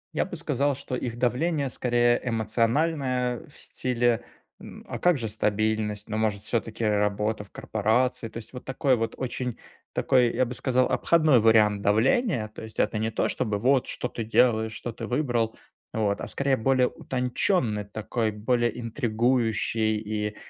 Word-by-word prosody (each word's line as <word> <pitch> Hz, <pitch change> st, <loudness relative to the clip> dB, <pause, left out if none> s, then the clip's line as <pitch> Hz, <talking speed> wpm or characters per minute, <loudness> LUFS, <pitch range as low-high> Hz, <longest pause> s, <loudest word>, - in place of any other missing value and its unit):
Я -, -, +1 dB
бы -, -, -7 dB
сказал, 140 Hz, 0 st, 0 dB
что 130 Hz, -1 st, -5 dB
их 120 Hz, -2 st, -4 dB
давление 140 Hz, +3 st, 0 dB
скорее 120 Hz, -1 st, +2 dB
эмоциональное, 125 Hz, +2 st, 0 dB
в 145 Hz, -, -17 dB
стиле, 120 Hz, -2 st, 0 dB, 0.4 s
м: -, -, -11 dB
"А -, -, -5 dB
как 175 Hz, -4 st, +3 dB
же 115 Hz, -3 st, -3 dB
стабильность, 105 Hz, 0 st, -1 dB
но, 110 Hz, 0 st, -3 dB
может, 105 Hz, -2 st, 0 dB
всё-таки 115 Hz, -1 st, -2 dB
работа 105 Hz, 0 st, 0 dB
в 100 Hz, -, -19 dB
корпорации?" 115 Hz, +3 st, 0 dB
То 115 Hz, -, -9 dB
есть 115 Hz, +3 st, -9 dB
вот 125 Hz, -, -8 dB
такой 130 Hz, 0 st, +1 dB
вот 115 Hz, -1 st, -2 dB
очень 125 Hz, -2 st, -3 dB, 0.3 s
такой, 125 Hz, -3 st, +3 dB
я 130 Hz, +1 st, +2 dB
бы 125 Hz, -, -5 dB
сказал, 130 Hz, 0 st, +1 dB
обходной 155 Hz, -7 st, +4 dB
вариант 105 Hz, -2 st, +4 dB
давления. 115 Hz, -, +2 dB
То -, -, -11 dB
есть 110 Hz, -1 st, -10 dB
это 110 Hz, -, +1 dB
не 110 Hz, +1 st, 0 dB
то 110 Hz, -, 0 dB
чтобы: 110 Hz, -5 st, -1 dB
"Вот, 130 Hz, +4 st, +2 dB
что -, -, -2 dB
ты 115 Hz, -2 st, -5 dB
делаешь, 110 Hz, -1 st, +3 dB
что 120 Hz, -, -5 dB
ты 115 Hz, -1 st, -6 dB
выбрал?" 120 Hz, -4 st, 0 dB, 0.4 s
Вот, 105 Hz, -2 st, 0 dB
а, -, -, -4 dB
скорее, 140 Hz, -1 st, 0 dB
более 130 Hz, +2 st, +3 dB
утонченный, 125 Hz, -, 0 dB
такой 110 Hz, +2 st, -2 dB
более 120 Hz, +2 st, 0 dB
интригующий 115 Hz, -2 st, 0 dB
и 105 Hz, 0 st, -3 dB
115 Hz, 165 wpm, -26 LUFS, 110-125 Hz, 0.4 s, обходной